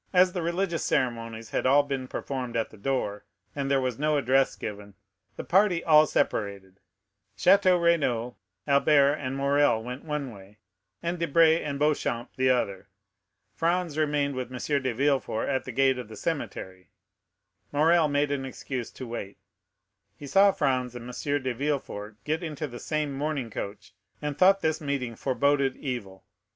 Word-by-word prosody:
As 180 Hz, 0 st, +5 dB
the 180 Hz, -, -2 dB
religious 170 Hz, 0 st, -1 dB
ceremonies 115 Hz, -3 st, -2 dB
had -, -, 0 dB
all 140 Hz, +2 st, +5 dB
been 135 Hz, -2 st, -4 dB
performed 125 Hz, -3 st, -4 dB
at 115 Hz, -, -1 dB
the 110 Hz, -, -14 dB
door, 105 Hz, -3 st, -2 dB, 0.3 s
and 140 Hz, -1 st, -2 dB
there 140 Hz, -1 st, +3 dB
was 130 Hz, -2 st, -2 dB
no 150 Hz, 0 st, +2 dB
address 135 Hz, 0 st, +2 dB
given, 105 Hz, -2 st, -7 dB, 0.4 s
the -, -, -6 dB
party 185 Hz, -2 st, +3 dB
all 155 Hz, -1 st, +6 dB
separated; 100 Hz, -6 st, -2 dB, 0.6 s
Château 185 Hz, -, +5 dB
Renaud, 130 Hz, -9 st, +1 dB, 0.3 s
Albert, 140 Hz, 0 st, +4 dB
and 130 Hz, -1 st, -4 dB
Morrel, 140 Hz, -4 st, +2 dB
went 125 Hz, +3 st, -7 dB
one 150 Hz, -5 st, -4 dB
way, 100 Hz, +1 st, -15 dB, 0.5 s
and 170 Hz, +1 st, -2 dB
Debray 165 Hz, 0 st, +4 dB
and 140 Hz, -2 st, -3 dB
Beauchamp 140 Hz, -5 st, -1 dB
the 130 Hz, 0 st, +2 dB
other. 100 Hz, -7 st, 0 dB, 0.7 s
Franz 170 Hz, -1 st, 0 dB
remained 145 Hz, -2 st, 0 dB
with 130 Hz, -1 st, -5 dB
M. 140 Hz, +3 st, -1 dB
de 130 Hz, -1 st, -1 dB
Villefort; 135 Hz, -2 st, 0 dB
at 135 Hz, -2 st, -1 dB
the 130 Hz, -, -5 dB
gate 130 Hz, +1 st, +2 dB
of 125 Hz, -, -7 dB
the 110 Hz, -, -10 dB
cemetery 95 Hz, -, -5 dB, 0.8 s
Morrel 160 Hz, +2 st, +4 dB
made 145 Hz, 0 st, +1 dB
an 140 Hz, -2 st, -1 dB
excuse 130 Hz, -2 st, -5 dB
to 130 Hz, -, -9 dB
wait; 115 Hz, -4 st, -6 dB, 0.8 s
he 145 Hz, -, -9 dB
saw 195 Hz, +7 st, +5 dB
Franz 130 Hz, -6 st, -1 dB
and 120 Hz, 0 st, -8 dB
M. 140 Hz, +3 st, -2 dB
de 130 Hz, -1 st, -1 dB
Villefort 120 Hz, -6 st, -3 dB
get 155 Hz, +3 st, -1 dB
into 155 Hz, -3 st, -4 dB
the 120 Hz, -4 st, -8 dB
same 150 Hz, -2 st, -2 dB
mourning 140 Hz, -4 st, -3 dB
coach, 100 Hz, -1 st, -7 dB, 0.3 s
and 150 Hz, -1 st, -3 dB
thought 195 Hz, +4 st, +5 dB
this 160 Hz, +1 st, 0 dB
meeting 135 Hz, -5 st, -3 dB
forboded 140 Hz, +1 st, +1 dB
evil. 105 Hz, -9 st, -5 dB
140 Hz, 165 wpm, -27 LUFS, 120-150 Hz, 0.8 s, all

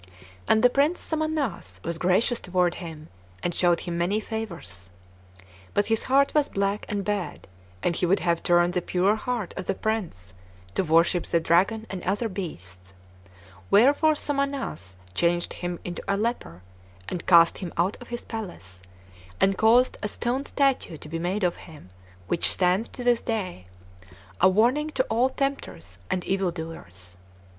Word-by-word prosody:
And 220 Hz, -, +4 dB
the 250 Hz, -, +8 dB
Prince 290 Hz, +7 st, +2 dB
Somannass 310 Hz, -, -2 dB
was 170 Hz, -1 st, -4 dB
gracious 190 Hz, +7 st, +2 dB
toward 180 Hz, -1 st, +1 dB
him, 160 Hz, -2 st, -8 dB, 0.3 s
and 175 Hz, -, 0 dB
showed 175 Hz, -1 st, +2 dB
him 170 Hz, -1 st, -3 dB
many 190 Hz, +5 st, +1 dB
favors. 175 Hz, -, -6 dB, 0.9 s
But 205 Hz, -, +3 dB
his 225 Hz, -, -1 dB
heart 275 Hz, +1 st, +3 dB
was 300 Hz, -2 st, +2 dB
black 200 Hz, +1 st, -1 dB
and 200 Hz, -3 st, -2 dB
bad, 205 Hz, -3 st, -3 dB, 0.4 s
and 170 Hz, -, +1 dB
he 180 Hz, -, +1 dB
would 195 Hz, +3 st, +2 dB
have 170 Hz, -1 st, +1 dB
turned 175 Hz, 0 st, +3 dB
the 180 Hz, -, 0 dB
pure 185 Hz, +4 st, +2 dB
heart 225 Hz, -3 st, -3 dB
of 185 Hz, -, -6 dB
the 195 Hz, -, 0 dB
prince 175 Hz, -, -3 dB, 0.4 s
to -, -, +1 dB
worship 165 Hz, +1 st, +3 dB
the 170 Hz, -, +2 dB
dragon 190 Hz, +7 st, +2 dB
and 190 Hz, -2 st, -5 dB
other 205 Hz, +5 st, 0 dB
beasts; 95 Hz, -, -8 dB, 0.7 s
wherefore 285 Hz, +8 st, +5 dB
Somannass 275 Hz, -, -2 dB, 0.2 s
changed 175 Hz, -, +1 dB
him 175 Hz, -1 st, -4 dB
into 175 Hz, -, -4 dB
a 200 Hz, -, +1 dB
leper, 210 Hz, -, -3 dB, 0.4 s
and 175 Hz, -, -5 dB
cast 170 Hz, -2 st, +6 dB
him 180 Hz, -4 st, -5 dB
out 180 Hz, +5 st, +1 dB
of 245 Hz, -, -10 dB
his 240 Hz, 0 st, -5 dB
palace, 175 Hz, -, -7 dB, 0.6 s
and 195 Hz, 0 st, +3 dB
caused 230 Hz, +5 st, +4 dB
a 210 Hz, -, -1 dB
stone 245 Hz, +6 st, -2 dB
statue 270 Hz, -, +1 dB
to 150 Hz, -, -11 dB
be 165 Hz, +1 st, -3 dB
made 185 Hz, +4 st, -1 dB
of 175 Hz, -1 st, +1 dB
him, 150 Hz, -, -13 dB, 0.4 s
which 170 Hz, -, +1 dB
stands 185 Hz, +4 st, +2 dB
to 250 Hz, -, -7 dB
this 245 Hz, -1 st, +3 dB
day, 185 Hz, -, -3 dB, 0.7 s
a 190 Hz, -, +7 dB
warning 245 Hz, +10 st, +2 dB
to 260 Hz, -, +3 dB
all 240 Hz, +4 st, +3 dB
tempters 260 Hz, -, -4 dB
and 180 Hz, -, -1 dB
evil 195 Hz, -1 st, 0 dB
doers. 95 Hz, -, -7 dB
185 Hz, 165 wpm, -26 LUFS, 170-230 Hz, 0.9 s, the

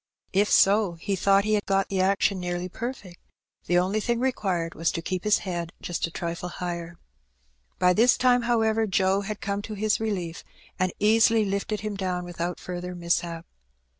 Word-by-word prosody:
If 205 Hz, +2 st, +3 dB
so, 200 Hz, -2 st, +4 dB
he 180 Hz, +4 st, -3 dB
thought 195 Hz, +1 st, +3 dB
he 215 Hz, +1 st, 0 dB
had 210 Hz, -1 st, 0 dB
got 195 Hz, 0 st, +1 dB
the 190 Hz, -1 st, 0 dB
action 195 Hz, 0 st, +2 dB
nearly 175 Hz, 0 st, -3 dB
perfect, 205 Hz, -3 st, -7 dB, 0.5 s
the 175 Hz, -, +3 dB
only 190 Hz, +4 st, +1 dB
thing 235 Hz, +2 st, -1 dB
required 190 Hz, -10 st, -1 dB
was 165 Hz, 0 st, 0 dB
to 165 Hz, -, -3 dB
keep 185 Hz, +1 st, -3 dB
his 210 Hz, -1 st, +4 dB
head 175 Hz, -2 st, -4 dB
just 175 Hz, -1 st, -2 dB
a -, -, -9 dB
trifle 170 Hz, +1 st, -4 dB
higher.'' 170 Hz, -1 st, -5 dB, 0.8 s
By 180 Hz, 0 st, +4 dB
this 235 Hz, +6 st, +4 dB
time, 250 Hz, -1 st, +4 dB
however, 225 Hz, -2 st, +1 dB
Joe 190 Hz, 0 st, +2 dB
had 210 Hz, +1 st, -5 dB
come 200 Hz, 0 st, -2 dB
to 215 Hz, 0 st, -7 dB
his 210 Hz, +1 st, +1 dB
relief, 185 Hz, -7 st, -3 dB, 0.4 s
and 185 Hz, 0 st, +1 dB
easily 220 Hz, +1 st, +4 dB
lifted 200 Hz, +1 st, -2 dB
him 215 Hz, 0 st, -3 dB
down 180 Hz, -2 st, -2 dB
without 175 Hz, 0 st, -4 dB
further 180 Hz, 0 st, -6 dB
mishap. 170 Hz, -1 st, -1 dB
195 Hz, 180 wpm, -26 LUFS, 175-215 Hz, 0.8 s, so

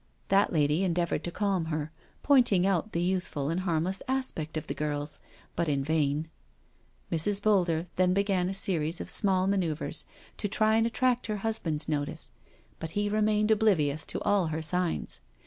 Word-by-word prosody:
That 195 Hz, +1 st, +4 dB
lady 150 Hz, +2 st, +2 dB
endeavoured 170 Hz, -3 st, 0 dB
to 175 Hz, -, -3 dB
calm 195 Hz, -3 st, 0 dB
her, 155 Hz, -1 st, -3 dB, 0.3 s
pointing 245 Hz, -10 st, +5 dB
out 195 Hz, +2 st, +1 dB
the 170 Hz, -, -1 dB
youthful 175 Hz, -6 st, -1 dB
and 170 Hz, -, -1 dB
harmless 180 Hz, +1 st, -1 dB
aspect 255 Hz, -, -2 dB
of 155 Hz, -, -4 dB
the -, -, -3 dB
girls, 150 Hz, 0 st, -3 dB, 0.4 s
but 170 Hz, -2 st, 0 dB
in 140 Hz, -2 st, 0 dB
vain. 150 Hz, 0 st, 0 dB, 0.8 s
Mrs. 195 Hz, +5 st, +2 dB
Boulder 180 Hz, -6 st, +2 dB
then 180 Hz, 0 st, +3 dB
began 190 Hz, -2 st, +1 dB
a 195 Hz, -, -4 dB
series 165 Hz, -4 st, 0 dB
of -, -, -6 dB
small 190 Hz, -2 st, +2 dB
ma 200 Hz, +1 st, +2 dB
noeuvres 165 Hz, -4 st, -2 dB, 0.3 s
to 205 Hz, -, -2 dB
try 215 Hz, +1 st, +2 dB
and 225 Hz, +1 st, +3 dB
attract 250 Hz, 0 st, +1 dB
her 215 Hz, -1 st, -2 dB
husband's 165 Hz, -9 st, -1 dB
notice 155 Hz, +1 st, -2 dB, 0.2 s
— -, -, -33 dB
but 160 Hz, 0 st, -6 dB
he 205 Hz, 0 st, +1 dB
remained 215 Hz, 0 st, +2 dB
oblivious 160 Hz, -9 st, +2 dB
to -, -, -2 dB
all 200 Hz, -4 st, +2 dB
her 160 Hz, 0 st, -3 dB
signs. 180 Hz, +1 st, 0 dB
180 Hz, 175 wpm, -29 LUFS, 155-205 Hz, 0.8 s, pointing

